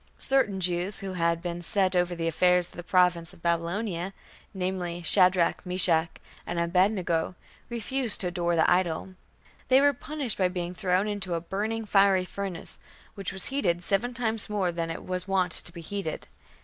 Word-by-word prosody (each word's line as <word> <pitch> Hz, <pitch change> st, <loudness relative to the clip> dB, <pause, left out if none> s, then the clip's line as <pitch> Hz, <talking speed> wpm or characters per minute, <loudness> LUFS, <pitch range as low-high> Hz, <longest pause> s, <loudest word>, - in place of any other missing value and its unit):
Certain 260 Hz, -8 st, +2 dB
Jews 180 Hz, +2 st, 0 dB
who 195 Hz, -1 st, -5 dB
had 170 Hz, -1 st, 0 dB
been 175 Hz, -1 st, -4 dB
"set 185 Hz, +1 st, +1 dB
over 180 Hz, 0 st, +1 dB
the 165 Hz, -1 st, -2 dB
affairs 180 Hz, +2 st, +3 dB
of -, -, -10 dB
the -, -, -8 dB
province 180 Hz, -1 st, +2 dB
of 170 Hz, -, -19 dB
Babylonia", 175 Hz, +2 st, -1 dB, 0.4 s
namely, 180 Hz, -2 st, -3 dB
"Shadrach, 180 Hz, 0 st, +3 dB
Meshach, 180 Hz, -3 st, +3 dB, 0.4 s
and 175 Hz, -, -2 dB
Abed 180 Hz, +4 st, +3 dB
nego", 175 Hz, -3 st, -1 dB, 0.3 s
refused 235 Hz, +1 st, 0 dB
to 185 Hz, -, 0 dB
adore 175 Hz, -1 st, 0 dB
the 160 Hz, -, +3 dB
idol. 180 Hz, 0 st, +1 dB, 0.5 s
They 260 Hz, 0 st, +6 dB
were 285 Hz, +1 st, +4 dB
punished 280 Hz, -3 st, -4 dB
by 185 Hz, -, +4 dB
being 180 Hz, -1 st, -4 dB
thrown 185 Hz, +1 st, 0 dB
into 195 Hz, -4 st, -2 dB
"a -, -, -1 dB
burning 215 Hz, +6 st, -3 dB
fiery 195 Hz, -2 st, +4 dB
furnace", 195 Hz, -2 st, -6 dB, 0.3 s
which 195 Hz, -3 st, -5 dB
was 190 Hz, -1 st, -4 dB
heated 180 Hz, -11 st, 0 dB
"seven 230 Hz, +7 st, 0 dB
times 225 Hz, -3 st, +3 dB
more 195 Hz, -4 st, 0 dB
than 170 Hz, -1 st, -3 dB
it 165 Hz, -, -6 dB
was 185 Hz, 0 st, -3 dB
wont 185 Hz, -3 st, +1 dB
to 175 Hz, -, -2 dB
be 170 Hz, -1 st, -9 dB
heated". 175 Hz, -1 st, -5 dB
180 Hz, 175 wpm, -27 LUFS, 175-200 Hz, 0.5 s, They